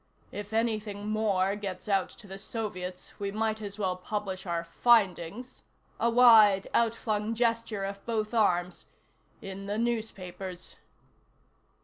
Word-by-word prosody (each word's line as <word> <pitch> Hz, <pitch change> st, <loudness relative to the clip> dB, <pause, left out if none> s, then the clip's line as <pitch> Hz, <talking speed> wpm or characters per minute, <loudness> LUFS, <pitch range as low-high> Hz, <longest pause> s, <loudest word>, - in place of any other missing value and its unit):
"If 205 Hz, 0 st, -7 dB
anything 215 Hz, -2 st, -1 dB
more 200 Hz, -3 st, +1 dB
gets 195 Hz, -2 st, -6 dB
out 195 Hz, -2 st, +1 dB
to 220 Hz, -, -15 dB
the 195 Hz, 0 st, -8 dB
Soviets, 185 Hz, -4 st, -5 dB
we 200 Hz, -1 st, -2 dB
might 220 Hz, +1 st, -1 dB
as 205 Hz, -1 st, -6 dB
well 190 Hz, -3 st, 0 dB
publish 190 Hz, 0 st, -4 dB
our 170 Hz, -1 st, -1 dB
findings 210 Hz, +4 st, +1 dB, 0.2 s
" -, -, -36 dB
a 235 Hz, -, +3 dB
wide, 225 Hz, -5 st, +7 dB
outflung 225 Hz, -1 st, 0 dB
gesture 230 Hz, -3 st, 0 dB
of 195 Hz, 0 st, -6 dB
both 220 Hz, -1 st, -1 dB
arms 180 Hz, -5 st, +1 dB, 0.6 s
"in 195 Hz, +1 st, -7 dB
the 205 Hz, +1 st, -2 dB
newspapers." 195 Hz, -6 st, -4 dB
205 Hz, 130 wpm, -29 LUFS, 190-225 Hz, 0.6 s, wide